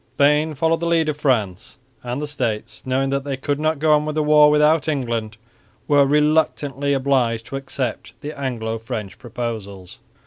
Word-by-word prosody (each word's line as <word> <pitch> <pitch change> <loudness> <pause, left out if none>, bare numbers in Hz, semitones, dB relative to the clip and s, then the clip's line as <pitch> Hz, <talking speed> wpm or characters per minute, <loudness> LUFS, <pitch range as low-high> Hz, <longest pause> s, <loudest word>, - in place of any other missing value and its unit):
Spain 150 +2 +3
followed 165 +3 +1
the 170 - -2
lead 165 -2 +2
of 150 - -2
France; 110 -8 -1 0.2
and 125 +2 -4
the 150 - -3
States, 115 -5 -4
knowing 135 +1 0
that 140 0 -1
they 140 -1 -3
could 145 +2 -2
not 155 0 0
go 155 +1 +3
on 150 0 +3
with 155 0 -4
the 155 - +1
war 150 0 +6
without 150 +1 +3
England, 115 -7 -2 0.5
were 145 -1 +4
reluctantly 150 -2 +1
obliged 130 -4 +1
to - - -7
accept 135 -3 -4
the 150 +1 -6
Anglo 115 -5 -3
French 105 -4 -6
proposals. 110 -6 -6
140 Hz, 175 wpm, -21 LUFS, 115-150 Hz, 0.5 s, war